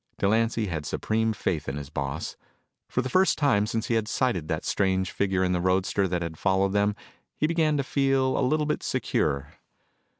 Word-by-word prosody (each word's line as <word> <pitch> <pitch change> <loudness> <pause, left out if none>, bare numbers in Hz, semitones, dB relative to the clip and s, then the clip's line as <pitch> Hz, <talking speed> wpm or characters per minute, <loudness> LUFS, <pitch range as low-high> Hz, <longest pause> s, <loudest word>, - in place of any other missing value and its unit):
Delancy 115 +2 +1
had 80 -6 -4
supreme 110 +1 0
faith 85 -9 -2
in 70 - -4
his 70 -1 -7
boss. 70 +2 -4 0.5
For 125 - 0
the - - -2
first 185 +8 +3
time 115 -8 +2
since 110 0 -2
he 120 - -1
had 110 -2 +1
sighted 115 - 0
that - - -2
strange 95 -1 +1
figure 95 -2 0
in 90 - +1
the 90 -1 0
roadster 95 +2 +1
that 90 -1 -1
had 80 -2 -6
followed 95 0 +2
them, 100 0 +2 0.4
he - - +1
began 155 -2 +2
to 140 - 0
feel 135 -1 +1
a - - +1
little 150 +4 +2
bit 150 - -1
secure. 70 -2 -1
100 Hz, 195 wpm, -26 LUFS, 90-130 Hz, 0.5 s, first